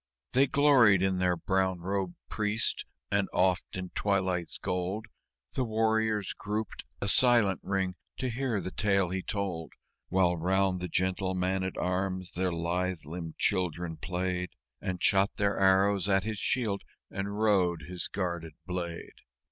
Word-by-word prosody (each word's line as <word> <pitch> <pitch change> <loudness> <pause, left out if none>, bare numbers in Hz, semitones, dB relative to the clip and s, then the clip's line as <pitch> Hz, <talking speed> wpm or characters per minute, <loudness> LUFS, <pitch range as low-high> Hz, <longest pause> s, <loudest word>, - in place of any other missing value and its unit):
They 135 +2 +4
gloried 125 -10 +5
in 95 -1 +1
their 90 -1 +2
Brown 95 0 0
robed 95 -1 -2
Priest; 110 +1 -1 0.3
and 100 -1 +1
oft 95 0 +1
in 90 -1 -5
twilight's 95 -4 0
gold 95 +3 -2 0.5
The 130 - 0
warriors 110 -3 +1
grouped, 105 +1 -4
a - - -2
silent 115 -4 +5
ring, 95 -1 -1 0.2
to 130 -1 -2
hear 120 -3 -1
the 95 - -4
tale 100 -3 +2
he 95 +1 -2
told, 95 -5 -3 0.4
While 90 -2 +3
round 95 +2 +1
the 90 - -3
gentle 95 +2 0
man 95 +1 0
at 95 - -3
arms 95 0 -1
their 90 +1 -1
lithe 85 0 -2
limbed 80 +1 -6
children 90 -3 0
played 90 +1 -2 0.3
And 95 -1 -3
shot 100 +1 +4
their 100 -1 +1
arrows 95 0 +4
at 95 -1 +3
his 110 -1 -3
shield 110 -6 0 0.3
and 100 +1 -3
rode 95 -6 +2
his 90 +3 -5
guarded 85 -4 -3
blade. 90 -2 -5
95 Hz, 150 wpm, -30 LUFS, 90-100 Hz, 0.5 s, gloried